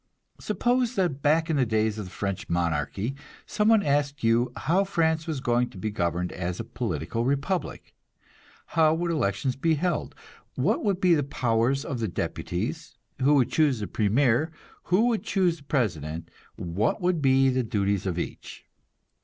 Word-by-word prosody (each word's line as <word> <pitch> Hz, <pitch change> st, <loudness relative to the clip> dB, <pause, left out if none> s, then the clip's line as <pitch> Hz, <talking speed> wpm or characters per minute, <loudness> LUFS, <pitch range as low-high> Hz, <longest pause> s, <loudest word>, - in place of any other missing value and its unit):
Suppose 245 Hz, +4 st, 0 dB
that 175 Hz, -9 st, 0 dB
back 160 Hz, +3 st, +3 dB
in 160 Hz, -, 0 dB
the 135 Hz, -, +3 dB
days 110 Hz, -1 st, 0 dB
of 105 Hz, -, -4 dB
the -, -, -9 dB
French 100 Hz, -2 st, -4 dB
monarchy 85 Hz, -, -1 dB, 0.3 s
some 210 Hz, -, 0 dB
one 220 Hz, -2 st, +5 dB
asked 145 Hz, -1 st, 0 dB
you 115 Hz, +2 st, +3 dB
how 185 Hz, +5 st, +1 dB
France 160 Hz, -4 st, 0 dB
was 155 Hz, -4 st, -2 dB
going 120 Hz, -2 st, +1 dB
to -, -, -13 dB
be 110 Hz, +3 st, -3 dB
governed 85 Hz, -2 st, -1 dB
as 90 Hz, 0 st, -4 dB
a -, -, -2 dB
political 115 Hz, -, -3 dB
republic; 140 Hz, +8 st, -2 dB, 0.8 s
how 160 Hz, -1 st, +4 dB
would 170 Hz, +1 st, -1 dB
elections 125 Hz, -, 0 dB
be 160 Hz, +4 st, +1 dB
held, 175 Hz, +1 st, -2 dB, 0.4 s
what 180 Hz, -, +1 dB
would 200 Hz, -4 st, +1 dB
be 180 Hz, -2 st, +4 dB
the 155 Hz, -, +3 dB
powers 130 Hz, 0 st, 0 dB
of 135 Hz, -6 st, -3 dB
the 110 Hz, -, -1 dB
deputies, 125 Hz, -, -4 dB, 0.2 s
who 145 Hz, +3 st, +5 dB
would 130 Hz, -4 st, +2 dB
choose 145 Hz, -7 st, +2 dB
the 105 Hz, -, -3 dB
premier, 120 Hz, +9 st, +2 dB, 0.3 s
who 190 Hz, +6 st, +3 dB
would 235 Hz, -3 st, +1 dB
choose 180 Hz, -4 st, +1 dB
the 145 Hz, -, -17 dB
president, 85 Hz, -, -2 dB, 0.3 s
what 90 Hz, +6 st, -1 dB
would 180 Hz, -3 st, 0 dB
be 135 Hz, -1 st, +4 dB
the 130 Hz, 0 st, +1 dB
duties 100 Hz, -4 st, -1 dB
of 90 Hz, -2 st, -2 dB
each? 85 Hz, -, -6 dB
135 Hz, 170 wpm, -26 LUFS, 105-165 Hz, 0.8 s, one